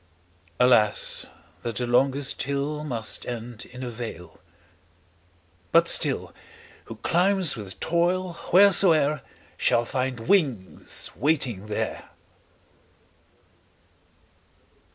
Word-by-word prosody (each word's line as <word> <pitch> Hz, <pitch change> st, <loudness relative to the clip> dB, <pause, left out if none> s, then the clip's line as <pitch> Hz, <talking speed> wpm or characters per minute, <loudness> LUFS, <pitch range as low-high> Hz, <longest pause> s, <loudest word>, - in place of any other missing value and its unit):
20 125 Hz, -, +5 dB
Alas, 105 Hz, -4 st, +2 dB, 0.4 s
that 115 Hz, -2 st, -4 dB
the 125 Hz, -, -2 dB
longest 135 Hz, +3 st, +1 dB
hill 140 Hz, +2 st, -2 dB
Must 120 Hz, -7 st, -4 dB
end 120 Hz, 0 st, -6 dB
in 125 Hz, +1 st, -10 dB
a 125 Hz, -, -4 dB
vale; 110 Hz, -7 st, -8 dB, 1.3 s
but -, -, +5 dB
still, -, -, 0 dB, 0.5 s
Who 115 Hz, -, -8 dB
climbs 180 Hz, -, +2 dB
with 100 Hz, -4 st, -9 dB
toil, 175 Hz, +2 st, 0 dB, 0.2 s
wheresoe'er, 170 Hz, -6 st, +5 dB, 0.4 s
Shall 120 Hz, 0 st, +2 dB
find 130 Hz, -1 st, -2 dB
wings 135 Hz, -, 0 dB
waiting 125 Hz, -8 st, 0 dB
there. 105 Hz, -, -4 dB
130 Hz, 90 wpm, -25 LUFS, 115-160 Hz, 1.3 s, 20